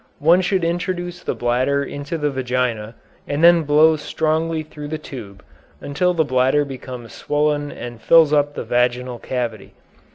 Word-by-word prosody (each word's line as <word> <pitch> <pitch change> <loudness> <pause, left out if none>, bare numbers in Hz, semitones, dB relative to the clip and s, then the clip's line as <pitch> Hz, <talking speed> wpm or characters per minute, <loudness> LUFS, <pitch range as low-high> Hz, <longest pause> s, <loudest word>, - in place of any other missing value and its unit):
One 170 +5 +4
should 185 -1 0
introduce 175 +1 -2
the - - -3
bladder 130 +4 0
into 145 +4 -5
the 150 -2 -1
vagina, 125 -4 -2 0.3
and 145 +3 -2
then 170 0 +7
blow 155 +1 +4
strongly 160 +1 -1
through 150 -1 -9
the 155 +1 -4
tube, 110 -10 -10 0.4
until 180 +6 0
the 160 -2 +2
bladder 130 +2 +2
becomes 125 -4 -9
swollen 145 0 -1
and 120 -1 -8
fills 160 +4 +5
up 145 -1 +2
the - - -4
vaginal 125 0 0
cavity. 120 -4 -4
145 Hz, 155 wpm, -20 LUFS, 125-160 Hz, 0.4 s, then